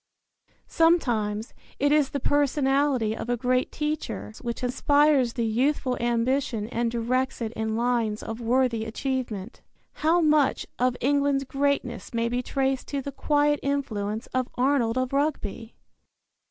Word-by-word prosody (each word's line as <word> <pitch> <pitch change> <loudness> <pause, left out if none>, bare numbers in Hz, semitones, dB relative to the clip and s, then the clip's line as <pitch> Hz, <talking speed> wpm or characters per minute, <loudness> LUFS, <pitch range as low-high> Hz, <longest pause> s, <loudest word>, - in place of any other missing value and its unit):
Sometimes 235 -11 +1 0.2
it 285 +1 +2
is 295 -3 +3
the 280 - -3
personality 275 -4 +1
of 240 - -6
a 245 - +1
great 255 +1 0
teacher 300 - -3
which 235 +1 -4
inspires 280 0 +3
the 235 - -1
youthful 255 +3 +1
ambition 235 -1 0
and 235 0 0
directs 245 +3 -1
it 230 -1 -3
in 220 -1 -2
lines 230 -3 0
of 225 +1 -6
worthy 235 -1 +1
achievement. 230 -3 -4 0.4
How 325 +3 +4
much 305 -4 +3
of 250 0 +1
England's 280 +1 +2
greatness 275 -3 -2
may 230 0 +1
be 245 +1 -1
traced 270 +1 -1
to 280 -2 -3
the 280 - -5
quiet 295 +1 +1
influence 225 -6 -2
of 255 -1 0
Arnold 255 -3 +1
of 255 0 -1
Rugby! 275 -6 -2
255 Hz, 140 wpm, -26 LUFS, 230-280 Hz, 0.4 s, How